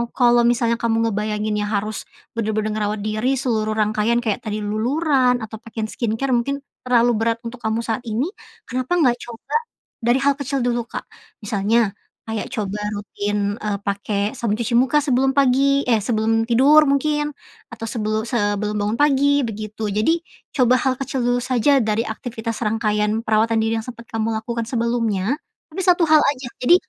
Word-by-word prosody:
kalau 240 -1 +4
misalnya 235 -1 +1
kamu 230 0 +1
ngebayanginnya 210 0 -1
harus 215 +1 -2 0.3
benar-benar 215 -1 -1
ngerawat 210 0 -1
diri 215 +5 0
seluruh 220 -4 0
rangkaian 215 +2 +1
kayak 215 -3 0
tadi, 210 0 -3
luluran 250 +4 +1
atau 220 0 -7
pakai 225 -1 -5
skincare 235 +3 -1
mungkin 275 +3 0 0.3
terlalu 240 -1 +4
berat 230 0 +1
untuk 235 +1 -7
kamu 220 +1 -1
saat 225 0 -1
ini, 240 - -1 0.3
kenapa 255 +6 -2
enggak 255 -8 +3
coba 235 - -7 0.5
dari 240 +3 +3
hal 280 0 +3
kecil 275 -1 -2
dulu, 240 -1 0
Kak? - - -6 0.4
Misalnya, 210 0 +1 0.3
kayak 220 -1 -2
coba 210 -5 -2 0.2
rutin, 205 0 -2
e 210 - -6
pakai 200 +2 -2
sabun 230 -3 0
cuci 235 +1 0
muka 265 +4 +4
sebelum 265 -1 +2
pagi, 275 +1 +3
eh, 230 -2 +4
sebelum 225 0 +1
tidur 270 +6 +6
mungkin, 295 +2 +1 0.4
atau 225 0 -6
sebelu 215 -2 -1
sebelum 210 -2 0
bangun 210 +2 -1
pagi, 285 0 +4
begitu. 215 0 -5
Jadi, 215 +12 +2 0.3
coba 255 -2 +4
hal 265 - +2
kecil 270 -2 -2
dulu 245 0 +2
saja 255 +3 +3
dari 220 0 0
aktivitas 225 0 -5
rangkaian 210 0 0
perawatan 220 +1 +2
diri 225 0 0
yang 220 - -9
sempat 235 -1 -8
kamu 225 0 0
lakukan 230 +1 -3
sebelumnya, 235 0 0 0.3
tapi, 380 - -3
satu 355 -1 +5
hal 310 -1 +6
aja. 270 -4 0 0.2
Jadi, 340 +8 +7
230 Hz, 165 wpm, -21 LUFS, 215-255 Hz, 0.5 s, Jadi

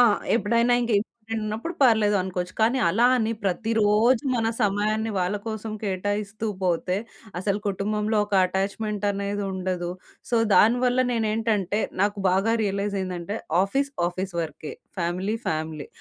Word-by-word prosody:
ఆ! - - +9 0.3
ఎప్పుడైనా 235 +2 +3
ఇంక 235 -1 -1
ఇంపార్టెంట్ 225 +1 -5
ఉన్నప్పుడు 220 +11 -4
పర్లేదు 220 -5 +4
అనుకోవచ్చు. 180 -1 -4
కానీ 235 +4 +3
అలా 225 +8 +4
అని 225 -2 0
ప్రతిరోజు 220 +5 +2
మన 225 -2 +1 0.2
సమయాన్ని 215 +2 +1
వాళ్ళ 180 +3 0
కోసం 220 0 -4
కేటాయిస్తూ 205 +2 -2 0.2
పోతే 180 +1 +1 0.4
అసలు 200 +2 0
కుటుంబంలో 210 +2 -1
ఒక 205 - -3
అటాచ్మెంట్ 200 +2 -2
అఅనేది 200 0 -2
ఉండదు. 180 -2 -2 0.4
సో 235 - +3 0.2
దానివల్ల 245 +3 +4
నేనేంటంటే 215 -3 0 0.2
నాకు 205 +1 +1
బాగా 195 +5 +2
రియలైజ్ 200 0 -1
అయిందంటే 185 +2 -4 0.3
ఆఫీస్ 275 +8 0 0.2
ఆఫీస్ 185 0 -5
వర్కే. 155 -1 -6 0.3
Family 180 +5 -1
family. 155 -1 -3
205 Hz, 130 wpm, -25 LUFS, 190-225 Hz, 0.4 s, ఆ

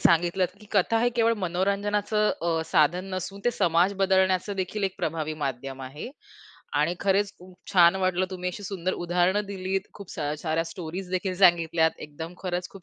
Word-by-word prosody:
सांगितलत 175 +2 +3
की 210 - -14
कथा 210 +3 +3
हे 240 - +3
केवळ 230 -1 +4
मनोरंजनाचं 205 +4 +1
अ, 165 -1 +1
साधन 175 +5 +3
नसून 195 +2 -5
ते 245 - +4
समाज 175 -2 +2
बदलण्याचंदेखील 190 +1 +1
एक 190 - -1
प्रभावी 155 -3 -2
माध्यम 135 0 -4
आहे 140 - -7 0.7
आणि 160 +4 +1
खरंच 200 +1 +2
खूप 180 0 -15 0.2
छान 175 -1 +6
वाटलं 185 -1 +1
तुम्ही 180 -1 -3
अशी 205 +3 -9
सुंदर 185 -2 -2
उदाहरणं 180 +4 +1
दिलीत, 190 -1 -2
खूप 200 -3 -10
स - - -6 0.2
साऱ्या 165 0 0
स्टोरीजदेखील 180 +3 -4
सांगितल्यात, 170 -3 +4
एकदम 160 +4 -8
खरंच 180 0 -2
खूप 195 - -13
185 Hz, 160 wpm, -26 LUFS, 170-195 Hz, 0.7 s, छान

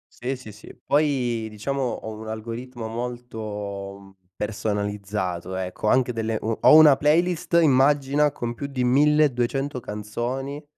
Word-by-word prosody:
Sì, 130 +3 -3
sì, 125 -4 -11
sì. 105 - -14
Poi, 130 -6 +1
diciamo, 125 +6 -3
ho 120 -3 -3
un 110 +1 -9
algoritmo 115 +2 -6
molto 105 -5 -6 0.2
personalizzato, 100 -4 -3
ecco, 95 +3 -4
anche 125 +2 +3
delle 115 -1 -2
mhmm, 110 0 -2
ho - - +8
una 155 -3 +8
playlist, 170 +4 +1
immagina, 145 0 +3
con 120 -2 -4
più 140 +4 -5
di 130 -3 -2
1200 135 -1 +2
canzoni 120 +7 -5
120 Hz, 130 wpm, -24 LUFS, 105-140 Hz, 0.2 s, ho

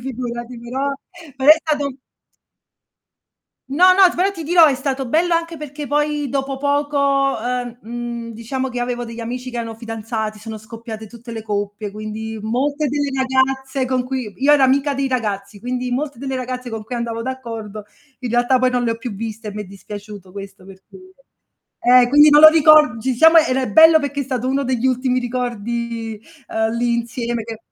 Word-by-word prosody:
figurati, 240 -1 -6
però 265 +4 -3 0.4
però 270 +2 +5
è 310 - +9
stato 290 -4 -2 1.7
No, 360 +7 +5
no, 375 -1 +6
t - - -9
però 385 +3 +1
ti 335 -4 -7
dirò, 330 +1 +6
è 280 - +3
stato 265 0 -3
bello 335 +7 +1
anche 335 0 -1
perché 295 0 -7
poi 295 0 0
dopo 270 0 -2
poco, 280 -2 +1
ehm, 245 0 -3
mhmm, 235 0 -6
diciamo 255 +4 -4
che 250 -1 -5
io - - -1
avevo 245 0 -3
degli 230 0 -8
amici 250 +2 -5
che 240 -1 -5
erano 225 -1 -5
fidanzati, 225 -1 -5
sono 220 0 -7
scoppiate 220 0 -9
tutte 235 +2 -12
le 225 -1 -6
coppie, 205 -1 -4
quindi 215 +1 -6
molte 285 +6 -1
delle 285 0 -1
ragazze 265 0 0
con 255 -1 0
cui 255 -5 -5
io 290 - +5
ero 280 -2 +5
amica 280 +2 +2
dei 275 0 -1
ragazzi, 210 -5 -3
quindi 250 +1 -3
molte 280 0 -3
delle 265 +1 -4
ragazze 255 0 -4
con 225 -2 -5
cui 240 +3 -6
andavo 230 -1 -3
d'accordo 230 -5 -6 0.4
in 245 -3 -4
realtà 245 +2 +3
poi 255 0 +2
non 245 -1 0
le 235 - 0
ho 230 - -3
più 235 -2 -6
viste 220 +1 -6
e - - -5
m'è 210 0 -5
dispiaciuto 200 0 -10
questo, 195 -1 -10
per 190 0 -14
dire 370 0 -15 0.9
eh, 245 - +3
quindi 295 +3 +7
non 295 +1 +7
lo 310 - +12
ricor 310 -5 +6
ci 260 +3 -1
siamo 320 +6 +6
era 265 -5 +3
ehm, 250 - -3
bello 320 0 +8
perché 285 -1 -3
è - - -2
stato 255 -1 -3
uno 275 +1 0
degli 255 -1 0
ultimi 255 0 +1
ricordi, 235 -2 -4 0.3
ehm, 220 0 -1
lì 240 0 +1
insieme 235 0 -3
che 225 0 -7
250 Hz, 195 wpm, -19 LUFS, 225-275 Hz, 1.7 s, lo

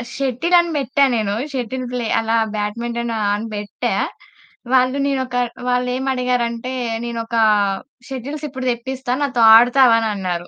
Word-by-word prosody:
Shuttle 275 +6 0
అని 340 -1 0
పెట్టా 275 +1 +1
నేను, 210 -2 -1 0.2
షటిల్ 255 0 -3
ప్లే 245 -2 -2
అలా 225 0 0 0.2
బ్యాడ్మింటన్ 235 +3 -3 0.2
అని 215 +2 -5
పెట్టా. 205 0 -3 0.8
వాళ్ళు 255 +1 +3
నేనొక 260 -2 -2 0.3
వాళ్ళు 250 0 +1
ఏమి 265 +1 -2
అడిగారంటే 250 -1 -1 0.3
నేనొక 230 0 -4 0.7
షటిల్స్ 280 +4 -5
ఇప్పుడు 260 -1 -6
తెప్పిస్తాను 260 +2 -3
నాతో 260 -4 0
ఆడతావా 245 0 +6
అనన్నారు. 180 -4 -3
250 Hz, 125 wpm, -19 LUFS, 230-265 Hz, 0.8 s, ఆడతావా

